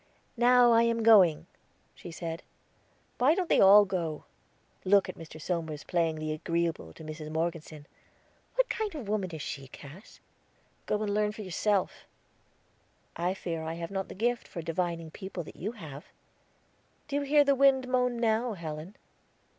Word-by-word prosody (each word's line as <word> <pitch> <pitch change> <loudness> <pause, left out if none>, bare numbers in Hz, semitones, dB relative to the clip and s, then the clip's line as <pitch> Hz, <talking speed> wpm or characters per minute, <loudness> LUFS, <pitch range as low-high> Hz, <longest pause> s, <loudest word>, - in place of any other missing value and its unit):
"Now 245 0 +5
I 230 0 +5
am 230 -1 +1
going," 180 -8 +6 0.5
she - - -11
said. 165 0 -6 0.8
"Why 280 +6 +4
don't 365 -2 -2
they - - +4
all 205 +2 +8
go?" 170 -5 -3 0.6
"Look 200 +1 +4
at - - -6
Mr. 160 -1 -11
Somers 160 -2 -3
playing 165 -3 0
the 155 0 -4
agreeable 165 - -2
to - - -12
Mrs. 155 0 -7
Morgeson. 160 -2 -4 0.7
What - - +3
kind 430 -7 -3
of 295 - -4
a - - -3
woman 200 -4 -1
is 160 -3 -7
she, 135 -2 -6
Cass?" 150 +9 -13 0.7
"Go 210 0 0
and 205 -1 -1
learn 210 0 +1
for 215 - -8
yourself." 195 +1 -1 1.1
"I 175 +3 -1
fear 165 -4 -4
I 160 +1 -4
have 170 +2 -6
not 195 -1 -3
the - - -10
gift 240 +4 -1
for 170 - -7
divining 165 -1 -3
people 190 -1 -7
that - - -12
you 210 +7 -4
have." 155 - -10 1.0
"Do 285 -1 -2
you - - 0
hear 290 +1 +4
the 280 -1 +3
wind 270 -1 +4
moan 250 -1 +1
now, 230 +1 +1
Helen?" 165 +1 -7
185 Hz, 170 wpm, -29 LUFS, 160-230 Hz, 1.1 s, all